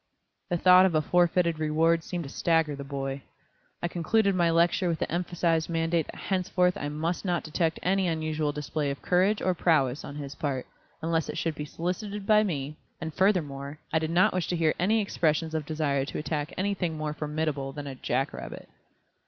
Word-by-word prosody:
The 175 - +1
thought 185 +2 +7
of 170 - -2
a 155 - +4
forfeited 175 -1 +2
reward 160 +2 +2
seemed 175 0 -4
to 135 - -8
stagger 165 -3 +1
the 140 - -7
boy. 135 0 -4 0.6
I - - +2
concluded 200 +5 +1
my 175 -2 +3
lecture 170 +2 +3
with 165 - 0
the - - -3
emphasized 170 -1 0
mandate 165 -1 0
that - - -9
henceforth 180 -1 +1
I 145 - -3
must 160 +4 -2
not 175 -3 0
detect 165 +1 0
any 190 0 +2
unusual 155 -2 -1
display 150 0 -2
of 140 - -5
courage 190 +4 +2
or 185 - +2
prowess 150 -6 +2
on 140 - -7
his 140 -1 -6
part, 140 -3 -3 0.4
unless 165 -1 0
it 155 - -4
should 165 -1 -1
be 150 0 -5
solicited 195 +6 -4
by 215 0 +5
me, 150 -7 -3 0.2
and 160 - -5
furthermore, 150 -7 0 0.2
I 160 - +4
did 160 0 -2
not 175 +2 +4
wish 185 -2 -1
to 180 - -1
hear 160 -2 +2
any 215 +5 +3
expressions 160 -5 0
of 155 -2 -2
desire 150 -3 0
to - - -5
attack 150 0 -2
anything 185 -4 -1
more 155 -1 -2
formidable 150 -2 -2
than 145 +1 -7
a 140 - -5
jack 130 +1 -1
rabbit. - - -8
165 Hz, 195 wpm, -28 LUFS, 150-180 Hz, 0.6 s, thought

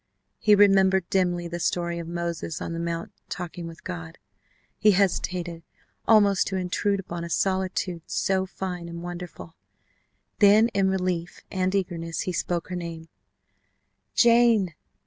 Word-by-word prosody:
He 210 -1 +5
remembered 190 -2 +5
dimly 175 -2 +1
the 170 0 -5
story 170 0 -1
of 170 - -6
Moses 170 -1 -3
on - - -4
the 165 - -4
Mount 170 0 -3 0.2
talking 175 -1 -5
with 165 0 -11
God. 85 -2 -7 0.6
He 210 0 +5
hesitated 180 -3 0 0.5
almost 205 -4 +5
to 190 - -2
intrude 190 +2 0
upon 175 -2 -5
a 170 - -6
solitude 185 0 -1
so 190 -1 0
fine 180 -2 -5
and 170 0 -7
wonderful. 175 -2 -8 0.9
Then 210 +2 +6
in 195 -3 +1
relief 180 -2 -2
and 185 0 0
eagerness 170 -4 -2
he 185 - -3
spoke 175 0 -2
her 180 - -3
name: 165 -2 -6 1.1
"Jane!" 235 -6 +5
180 Hz, 140 wpm, -26 LUFS, 170-195 Hz, 1.1 s, Then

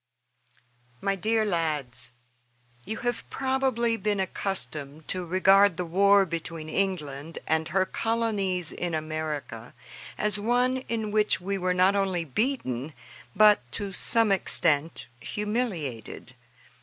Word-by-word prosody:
MY 195 0 0
DEAR 220 +3 +1
LADS: 155 - -2 0.8
You 220 +3 -4
have 240 0 -1
probably 260 -3 0
been 210 -2 -1
accustomed 155 -6 -3
to 185 - -1
regard 190 +1 +5
the 180 - -2
war 200 +3 +4
between 165 -2 -5
England 160 -5 -2
and 160 0 0
her 185 +3 +1
colonies 200 -7 -1
in 175 -2 -3
America 155 -7 -5 0.4
as 210 -1 0
one 245 +4 +2
in 220 -2 -2
which 210 0 +2
we 195 +2 -3
were 180 0 0
not 185 +2 +4
only 190 -4 0
beaten 150 - -2 0.4
but, 210 -5 +6
to 200 -1 -2
some 225 +2 +4
extent, 165 -5 +1
humiliated. 205 - -4
190 Hz, 120 wpm, -27 LUFS, 160-210 Hz, 0.8 s, but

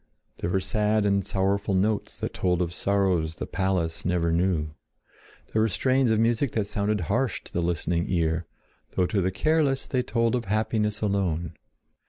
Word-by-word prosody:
There - - -2
were 95 +2 +1
sad 105 +2 +1
and 100 -1 +1
sorrowful 100 +1 0
notes 105 +3 0
that - - -3
told 90 -2 +1
of 85 -1 -1
sorrows 90 -5 +1
the - - -4
palace 90 -3 -1
never 85 -2 +1
knew. 85 -3 +1 0.8
There 110 - +3
were 110 - +4
strains 130 +5 +2
of 110 -1 +2
music 115 +3 +1
that 110 -3 0
sounded 105 0 -1
harsh 80 - -1
to - - -14
the 85 - 0
listening 85 0 0
ear, 85 -1 0 0.5
though 90 - +3
to 100 +1 0
the 95 - +1
careless 140 - +1
they 130 - 0
told 115 -1 0
of 120 -2 -1
happiness 105 0 0
alone. 95 -6 0
100 Hz, 175 wpm, -26 LUFS, 90-110 Hz, 0.8 s, were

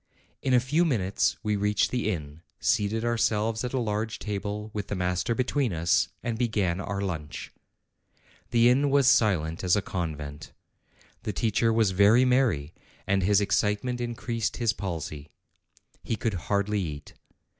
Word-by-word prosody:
In 130 - -1
a - - +6
few 145 +8 +1
minutes 105 - +1
we 105 -1 0
reached 105 +1 +1
the 125 -4 0
inn, 75 -5 -5 0.2
seated 110 +3 +1
ourselves 115 -1 +1
at 125 - -3
a 135 - -1
large 110 -1 -2
table, 105 +1 -4
with 105 -1 -4
the - - -3
master 90 +4 0
between 130 0 0
us, 85 +1 +2 0.2
and 115 -1 -3
began 100 -7 0
our 100 0 -3
lunch. 80 -7 -5 1.0
The 120 0 +4
inn 125 +3 +4
w 140 -1 +2
r - - +6
as 130 - +2
silent 95 - +2
as 90 -2 +4
a 105 - +1
convent. 75 -4 -5 0.7
The 105 - -4
teacher 115 +3 +1
was 110 -3 +3
very 105 +6 +5
merry, 115 - +1 0.3
and 100 0 +1
his 100 +2 +3
excitement 105 +5 0
increased 120 -1 -3
his 115 -3 +1
palsy: 80 -7 -5 0.7
he 115 - -2
could 110 -1 -2 0.2
hardly 100 0 +1
eat. 75 -5 -6
105 Hz, 160 wpm, -27 LUFS, 90-120 Hz, 1.0 s, a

